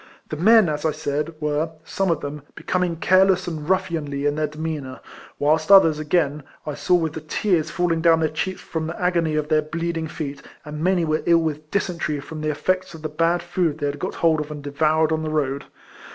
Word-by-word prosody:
The - - -3
men, 215 +5 +5
as 150 -1 -2
I 160 - +2
said, 150 +1 -3
were, 150 +1 -1
some 195 +3 -1
of 165 -3 0
them, 145 +1 -5
becoming 180 -2 -1
care 185 +3 +4
less 185 -2 +2
and 155 -2 -5
ruffianly 165 -7 -1
in 145 - +2
their 155 0 -1
demeanour; 150 -3 -5 0.4
whilst 155 +4 +2
others, 165 -6 +7
again, 150 -1 0 0.2
I 150 - -3
saw 180 - +2
with 160 -3 0
the 160 - -6
tears 165 +1 0
falling 175 -3 0
down 165 -1 +5
their 160 - +2
cheeks 185 +5 -3
from 160 -1 -4
the 165 - -6
agony 170 -3 +1
of 150 0 -1
their 155 -1 +3
bleeding 165 +1 -3
feet, 145 -3 -6 0.2
and 150 +1 -6
many 180 -2 +2
were 155 0 0
ill 170 -1 +6
with 155 -1 -4
dy - - +1
sentery 170 -6 -3
from 155 +2 -8
the 155 - -2
eifects 185 +4 -1
of 160 - -12
the 155 - -2
bad 165 +3 +1
food 175 -3 -1
they 145 - -3
had 145 0 -3
got - - -4
hold 160 -2 +2
of 150 0 -4
and 150 -1 -7
devoured 155 +2 +1
on 160 0 0
the 155 - -3
road. 140 -2 -1
160 Hz, 225 wpm, -22 LUFS, 150-170 Hz, 0.4 s, others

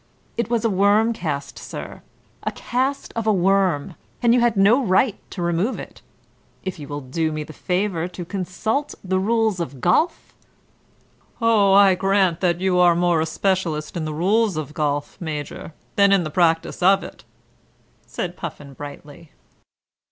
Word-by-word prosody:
It 235 -2 -2
was 235 -1 0
a - - +3
worm 205 +4 +3
cast, 150 -8 -4
sir, - - -8 0.4
a - - -2
cast 260 +3 -2
of 225 -1 -2
a - - +5
worm, 185 -5 +1 0.3
and 235 -1 +5
you 245 - +4
had 235 -3 +2
no 220 +8 +5
right 205 +2 +2
to 180 - -5
remove 175 +8 0
it. - - -10 0.6
If 190 -3 -5
you 145 - -8
will 145 0 -5
do 155 +5 -2
me 155 0 -3
the 155 +1 -11
favour 180 0 -1
to 180 -1 -8
consult 205 - -2
the 190 0 0
rules 220 -1 +1
of 145 -6 -5
golf 310 - +1 0.5
?" - - -36
"Oh, 220 -4 +4
I 195 -1 +7
grant 190 -2 +2
you 180 - +1
that 170 0 0
you 185 -1 +1
are 175 -1 +5
more 175 -2 +2
a 160 - -1
specialist 170 -3 -1
in 165 -2 -2
the 155 - -3
rules 200 +3 +2
of 150 -1 -5
golf, 145 -1 -2
Major, 150 -1 -5 0.3
than 200 0 +5
in 195 -3 +4
the 155 - -5
practice 165 0 +1
of 195 +2 +4
it," - - -11 0.8
said 175 -1 -4
Puffin 145 -5 -8
brightly. 145 +2 -10
185 Hz, 175 wpm, -22 LUFS, 160-205 Hz, 0.8 s, I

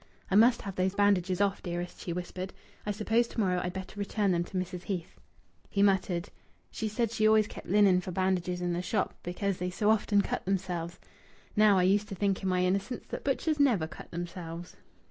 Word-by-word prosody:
"I - - +3
must 235 +3 +5
have 195 -2 -6
those 185 +1 +1
bandages 195 -2 +2
off, 200 -1 +1
dearest," 175 0 -5
she 175 - -4
whispered. 180 +2 -5 0.3
"I - - +1
suppose 225 +3 +1
to - - -6
morrow 180 -4 +2
I'd 180 - -2
better 190 +2 -7
return 200 0 0
them 170 -1 +1
to 190 - -5
Mrs. 180 0 -4
Heath." 180 -4 -4 0.5
He 200 - +2
muttered: 190 -3 +1 0.4
"She 220 - -3
said 225 +1 -1
she 215 -2 +2
always 215 0 +5
kept - - -10
linen 195 -2 +5
for 185 - -7
bandages 180 -1 0
in 175 -1 0
the 175 - -1
shop 195 +2 -1
because 185 +2 -2
they 180 0 -1
so 205 +4 +2
often 205 -1 +3
cut - - -3
themselves. 180 -3 -2 0.6
Now, 210 -2 +6
I 180 - +4
used 200 +3 +3
to 195 - -5
think 195 0 0
in 190 - -1
my 180 0 +2
innocence 195 +6 -1
that - - -5
butchers 295 +2 0
never 240 - +4
cut 160 - -10
themselves." 170 0 -6
190 Hz, 205 wpm, -30 LUFS, 180-205 Hz, 0.6 s, Now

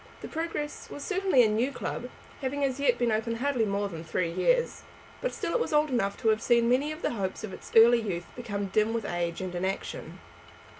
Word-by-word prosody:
The - - -6
Progress 320 -2 -4
was 285 - -7
certainly 380 -9 +3
a - - +5
new 225 +6 +1
club, 250 -2 -4 0.3
having 280 +2 -1
as 270 -1 0
yet 275 -4 +3
been 240 -2 +1
open 225 +2 0
hardly 250 -1 +1
more 200 0 0
than 165 -4 -7
three 165 +1 -1
years; - - +1 0.4
but - - -1
still - - -3
it - - +2
was 470 - -1
old 300 -1 +3
enough 200 -5 0
to 225 - +3
have 220 0 +2
seen 235 -1 +3
many 265 +5 +2
of 310 +2 -8
the - - +1
hopes 195 -4 -3
of 205 -3 -5
its - - -10
early 235 +1 +8
youth 175 -5 -3
become 205 -5 -3
dim 215 +3 +2
with 230 -3 -2
age 175 -1 -2
and 185 -1 -4
inaction. 190 +2 -4
230 Hz, 220 wpm, -28 LUFS, 200-280 Hz, 0.4 s, early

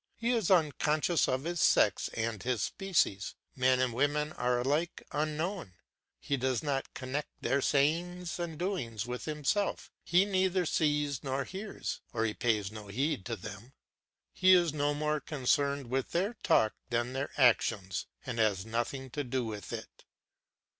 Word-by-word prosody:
He 235 +1 0
is 225 -7 +1
unconscious 155 -1 +3
of 130 +1 0
his 170 -1 -2
sex - - +4
and 110 -3 -2
his 125 -4 0
species; 170 - 0 0.2
men 130 0 +3
and 130 -2 +1
women 145 +4 +1
are 125 0 +1
alike 150 +7 -1
unknown; 155 - -2 0.4
he 140 - -1
does 130 0 0
not 140 -3 -1
connect 135 +3 -3
their 135 +3 +1
sayings 170 +5 +1
and 165 -3 -4
doings 135 - -2
with 125 0 -5
himself, 155 +7 -1
he 180 +3 +4
neither 190 -2 +1
sees 150 -3 +1
nor 135 0 -1
hears, 195 +8 -5
or 115 -1 +1
he 105 - 0
pays 105 -4 0
no 110 -1 -9
heed 125 0 -1
to 115 - -2
them; 110 +5 -9 0.6
he 185 0 +6
is 175 -4 +4
no 145 -1 +1
more 150 +1 0
concerned 140 -1 0
with 135 0 -1
their 195 +7 +1
talk 110 -11 +3 0.2
than 120 +1 0
their 135 +2 -2
actions; 110 -7 +2 0.2
he 125 - -3
has 105 -4 +2
nothing 120 +4 -3
to 145 - -2
do 125 -1 -1
with 105 -2 -6
it. - - -8
140 Hz, 160 wpm, -31 LUFS, 120-160 Hz, 0.6 s, he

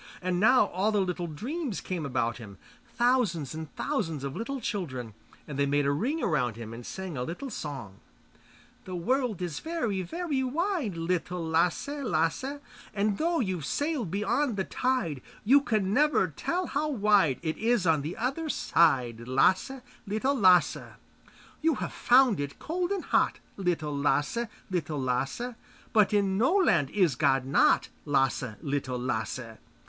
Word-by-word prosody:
And 180 -1 -1
now 250 +5 +6
all 195 +4 0
the 210 - +2
little 180 -2 -1
dreams 245 - -4
came 170 -6 -4
about 115 -3 -1
him, 100 -4 -10 0.4
thousands 235 - +1
and 160 -1 -7
thousands 165 - -2
of 140 -1 -4
little 270 +5 -4
children, 130 - -4 0.3
and 140 -2 -5
they 140 - +3
made 145 0 +2
a 140 - +3
ring 260 - -1
around 125 - +1
him 115 -1 -8
and 120 +1 -8
sang 190 +4 -6
a - - -2
little 210 - -5
song: 130 - -6 0.9
The 185 - -5
world 235 +1 0
is 170 -4 -3
very, 305 - -2
very 285 - -2
wide, 295 - -1
Little 175 0 -2
Lasse, 165 +6 +1 0.2
Lasse, 210 - 0 0.4
And 205 0 0
though 335 +1 +1
you've 185 - -2
sailed 290 - -1
beyond 210 - 0
the 190 - +1
tide, 190 - -1 0.2
You 275 +6 +6
can 210 -7 0
never 295 -7 +3
tell 350 - -2
how 305 -1 -1
wide 205 - +3
It 160 -1 -2
is 230 -3 +2
on 160 -3 +3
the 155 +5 -5
other 275 +7 -2
side, 125 - +2
Lasse, 185 - +2 0.3
Little 220 +7 0
Lasse. 185 -8 +3 0.7
You 325 -2 +3
have - - -4
found 245 - +4
it 140 -1 -4
cold 350 +2 -2
and 395 -2 -2
hot, - - +2 0.2
Little 165 -6 -1
Lasse, 150 +11 +1 0.2
Lasse; 150 - -2 0.4
But 215 -3 +4
in 200 -2 +2
no 265 - +3
land 325 - +3
is 185 -8 +2
God 135 +1 +2
not, 135 - +3 0.2
Lasse, 135 -5 +1
Little 140 -3 -2
Lasse. 115 -1 -3
185 Hz, 155 wpm, -28 LUFS, -, 0.9 s, now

